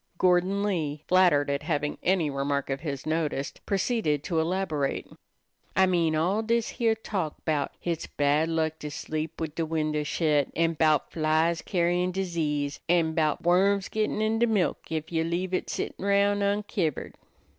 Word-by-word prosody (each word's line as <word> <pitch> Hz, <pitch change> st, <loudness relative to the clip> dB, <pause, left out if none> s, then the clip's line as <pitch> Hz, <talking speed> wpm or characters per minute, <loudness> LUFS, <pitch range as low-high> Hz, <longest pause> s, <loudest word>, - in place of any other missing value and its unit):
Gordon 185 Hz, +2 st, +2 dB
Lee, 155 Hz, -7 st, -2 dB
flattered 180 Hz, -6 st, +4 dB
at 140 Hz, -, -1 dB
having 150 Hz, -3 st, -2 dB
any 175 Hz, -5 st, +1 dB
remark 140 Hz, 0 st, -1 dB
of 135 Hz, -, -2 dB
his 140 Hz, -3 st, -5 dB
noticed, 155 Hz, -3 st, -2 dB
proceeded 195 Hz, -, 0 dB
to 165 Hz, -1 st, 0 dB
elaborate. 160 Hz, -4 st, -1 dB, 0.7 s
"I 190 Hz, +3 st, +5 dB
mean 170 Hz, -4 st, +2 dB
all 180 Hz, +7 st, +1 dB
dis 230 Hz, 0 st, 0 dB
heah 230 Hz, -3 st, +1 dB
talk 190 Hz, -8 st, -3 dB
'bout 150 Hz, -3 st, 0 dB
hits 170 Hz, -2 st, -3 dB
bein' -, -, -31 dB
bad 145 Hz, +3 st, +2 dB
luck 160 Hz, -1 st, -1 dB
to 150 Hz, -, -5 dB
sleep 155 Hz, +2 st, -4 dB
wid 160 Hz, -2 st, -3 dB
de 165 Hz, -, -2 dB
windows 155 Hz, -2 st, -1 dB
shet, 150 Hz, -4 st, +2 dB
an' 165 Hz, 0 st, +2 dB
bout 155 Hz, -2 st, +2 dB
flies 160 Hz, +1 st, +1 dB
carrying 175 Hz, 0 st, +1 dB
disease, 155 Hz, -6 st, -2 dB
an' 165 Hz, -2 st, +3 dB
'bout 155 Hz, -2 st, 0 dB
worms 190 Hz, +3 st, +3 dB
gittin' 215 Hz, 0 st, -1 dB
in 220 Hz, +1 st, +1 dB
de 235 Hz, -, +4 dB
milk 210 Hz, -5 st, +1 dB
ef 160 Hz, 0 st, -3 dB
you 160 Hz, -1 st, +1 dB
leave 175 Hz, +3 st, -2 dB
it 185 Hz, -, -1 dB
settin' -, -, -4 dB
roun' 200 Hz, 0 st, +3 dB
unkivered." 200 Hz, -, -1 dB
165 Hz, 165 wpm, -27 LUFS, 150-190 Hz, 0.7 s, I